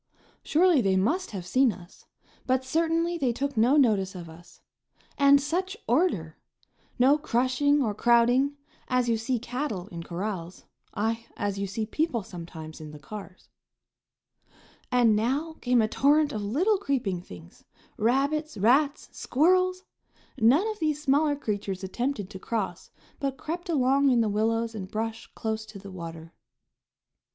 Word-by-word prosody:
Surely 335 -2 +3
they 195 -3 +2
must 310 - +1
have 190 -4 -6
seen 255 +6 +3
us, 180 -1 -14 0.4
but 260 0 +1
certainly 330 +4 0
they 260 -5 +1
took 275 +3 -3
no 240 +6 +4
notice 205 -8 +2
of 170 -2 -8
us. 175 +2 -16 0.6
And 280 0 +6
such 350 +7 -2
order! 230 - 0 0.6
No 275 +4 +4
crushing 280 +2 +2
or 215 -4 -1
crowding, 240 +5 +3 0.3
as 250 -1 +1
you 230 - +2
see 230 +3 -1
cattle 245 -5 -4
in 170 -1 -7
corrals, 180 0 -5 0.3
aye, 225 +2 -2
as 200 -1 -2
you 200 - -2
see 215 +3 -3
people 275 -1 -1
sometimes 165 -3 -9
in 155 - -8
the 150 - -10
cars. 195 +3 -10 1.4
And 240 -3 +4
now 280 +9 -1
came 245 -2 +3
a - - +2
torrent 290 +5 +3
of 215 - -3
little 340 - +1
creeping 240 - -1
things: 85 - -14 0.3
rabbits, 280 +7 0
rats, 275 +8 +2
squirrels! 365 +6 +2 0.5
None 270 - +4
of 430 - -5
these 305 -3 0
smaller 295 +1 +2
creatures 205 -7 -4
attempted 240 +2 -2
to 190 - -8
cross, 230 +3 -4 0.3
but 275 -1 -2
crept 345 +6 -5
along 275 -2 +3
in 245 -2 +4
the 220 - +1
willows 225 +2 0
and 190 -4 -6
brush 225 +2 -4
close 220 0 -3
to 215 - -10
the 200 0 -10
water. 165 -2 -8
240 Hz, 150 wpm, -27 LUFS, 200-285 Hz, 1.4 s, And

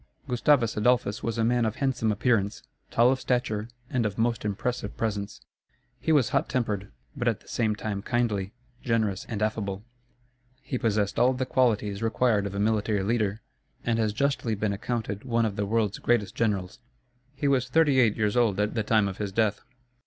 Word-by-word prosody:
Gustavus 125 -2 +2
Adolphus 110 -1 +1
was 115 0 -2
a 115 - +1
man 120 +1 +2
of 110 -1 -1
handsome 125 -5 0
appearance, 105 -1 0 0.3
tall 120 +2 +4
of 130 - 0
stature, 115 -4 -1 0.2
and 125 -2 0
of 105 -2 -2
most 115 0 0
impressive 105 +2 -3
presence. 105 -2 -3 0.6
He 140 +7 0
was 140 -7 +4
hot - - 0
tempered; 105 -6 -2 0.2
but 125 -3 -2
at 115 -2 +1
the - - -23
same 110 -3 0
time 105 -2 -4
kindly, 105 -4 -1 0.3
generous, 110 -5 0
and 105 -2 -2
affable. 100 -2 -2 0.8
He 130 - -3
possessed 105 -3 0
all 125 +2 +4
the 130 0 -2
qualities 110 -6 +1
required 115 -2 +1
of 100 - -7
a - - -2
military 105 -1 +1
leader, 110 -1 0 0.4
and 115 -1 +1
has 110 -2 +1
justly 120 -1 0
been 105 0 -1
accounted 105 -1 -3
one 115 -2 +1
of 105 -3 -2
the 100 0 -2
world's 110 -2 0
greatest 110 -5 +1
generals. 100 -5 -1 0.6
He 140 +1 -1
was 130 -2 +2
thirty 145 -2 +4
eight 110 -4 +3
years 105 -1 +1
old 115 -5 +2
at 105 +1 +1
the 110 - 0
time 105 -1 +2
of 95 0 -6
his 100 -2 -2
death. 105 0 +1
110 Hz, 185 wpm, -27 LUFS, 105-120 Hz, 0.8 s, tall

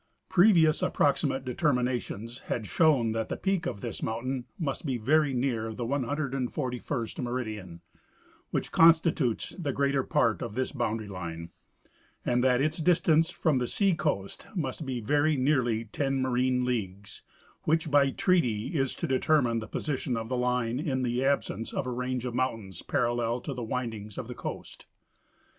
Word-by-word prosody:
Previous 175 -5 +5
approximate 140 -2 +1
determinations 125 - -1
had 115 - -2
shown 135 -5 +3
that 110 0 -2
the - - -3
peak 190 -3 0
of 100 - -4
this 120 - -5
mountain 120 +3 -2
must 145 -6 -3
be 135 -6 -1
very 145 +5 +3
near 120 -4 -1
the 120 - -3
141st 130 -2 -2
meridian, 110 -9 -4 0.7
which - - -2
constitutes 160 -7 +4
the 150 -5 -1
greater 140 0 +1
part 115 -3 +1
of 115 -3 -5
this 130 0 -1
boundary 115 -5 -2
line, 85 -3 -6 0.7
and 125 0 +2
that 125 -1 +3
its 155 +2 0
distance 165 -1 +3
from 150 -5 +1
the 125 - -1
seacoast 165 - 0
must 150 -3 -3
be 130 -2 -2
very 145 +6 +2
nearly 125 -5 +1
ten 135 +4 -1
marine 125 0 +1
leagues, 100 -5 -4 0.4
which 160 -1 +1
by 140 -1 +5
treaty 135 - +1
is 135 -3 0
to - - -3
determine 130 -3 +2
the 110 - -7
position 130 -3 -2
of 115 0 -4
the 130 - 0
line 125 -1 0
in 135 -5 -1
the 125 +1 0
absence 135 -5 0
of - - -1
a 125 - -3
range 125 0 -2
of 125 - -3
mountains 115 -8 -2
parallel 120 0 0
to 140 +3 -5
the 125 - -5
windings 110 -3 -4
of - - -5
the - - -6
coast. - - -7
125 Hz, 155 wpm, -28 LUFS, 115-145 Hz, 0.7 s, Previous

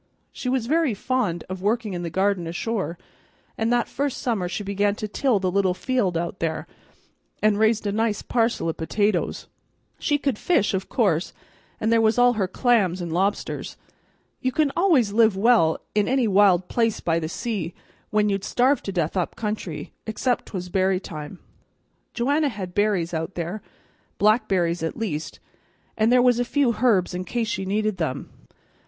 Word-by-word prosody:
She 250 - -4
was 255 -3 0
very 305 -3 +1
fond 210 -7 -1
of 185 0 -6
workin' 215 0 0
in 175 - -3
the 170 - -3
garden 190 0 0
ashore, 180 +1 -3 0.6
and 225 +1 0
that 240 -1 +2
first 280 -1 -2
summer 215 -9 -1
she 180 +3 -4
began 200 +1 0
to 215 - -4
till 240 +2 +1
the 185 -2 -1
little 190 -1 +2
field 210 -7 0
out 170 +2 -3
there, 160 -1 -2 0.8
and 210 -1 +3
raised 220 0 +2
a 200 - 0
nice 220 0 0
parcel 230 -7 0
o' 165 - 0
potatoes. 205 +7 -1 0.5
She 290 - +1
could 275 -6 -1
fish, 340 - +2
o' 190 - +2
course, 190 -4 0 0.5
and 220 +1 +1
there 230 - +4
was 220 +1 +3
all 245 0 +5
her 200 -5 0
clams 195 -4 +2
an' 170 -2 -4
lobsters. 195 +5 -1 0.6
You 255 - 0
can 305 0 +1
always 310 - +3
live 220 -3 +4
well 200 -7 +4 0.2
in 210 -1 +2
any 260 -3 +2
wild 190 -3 +4
place 230 -2 0
by 165 -1 0
the 160 -1 -4
sea 190 -5 -3 0.3
when 210 0 +2
you'd 195 -1 -1
starve 260 +6 +2
to 195 - -4
death 170 -3 -1
up 180 -2 -1
country, 210 -7 -4
except 240 +3 -1
'twas 180 -3 -5
berry 190 0 +1
time. 155 -1 -8 0.8
Joanna 285 +5 +1
had 190 -6 -6
berries 200 -5 +1
out 160 +3 -3
there, 175 +5 -4 0.6
blackberries 190 -6 +2
at 160 - -3
least, 170 -9 -4 0.6
and 220 +2 +2
there 250 0 +5
was 245 -1 +4
a - - +3
few 245 -3 +1
herbs 200 -8 +3
in 180 +1 -3
case 230 +3 -2
she 195 - -2
needed 210 +1 0
them. 160 -6 -3
205 Hz, 175 wpm, -24 LUFS, 180-235 Hz, 0.8 s, all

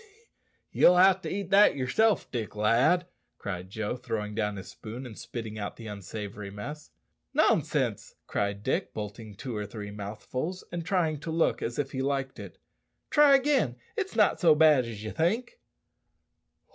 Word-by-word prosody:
"Ye'll 180 - +6
ha' 190 0 +6
to - - -4
eat 195 -1 -3
it 205 +1 +7
yerself, 195 +12 +1
Dick, 115 -4 -4
lad," 120 +12 +3 0.3
cried 95 -2 -5
Joe, 110 +3 -3
throwing 110 -4 -4
down 105 0 -1
his 95 -1 -8
spoon, 120 +4 -8
and 115 -4 -9
spitting 110 -1 -6
out 100 - -4
the 115 - -11
unsavoury 105 0 -6
mess. 145 +10 -8 0.5
"Nonsense," - - +1
cried 100 0 -2
Dick, - - -1
bolting 105 0 -6
two 125 +3 -6
or 105 -1 -3
three 105 -1 -7
mouthfuls, 110 - -5
and 170 -1 -3
trying 165 -4 0
to 160 - -7
look 165 +1 +1
as 120 - -3
if 145 -1 -2
he 130 - -3
liked 135 -1 -2
it. - - -9 0.5
"Try 295 -2 +7
again; 270 - +2 0.2
it's 390 -4 -3
not 210 -3 +3
so 160 -3 +6
bad 150 -5 +5
as 110 -3 -7
you 110 - -4
think." 225 - -1
125 Hz, 165 wpm, -28 LUFS, 105-175 Hz, 0.5 s, it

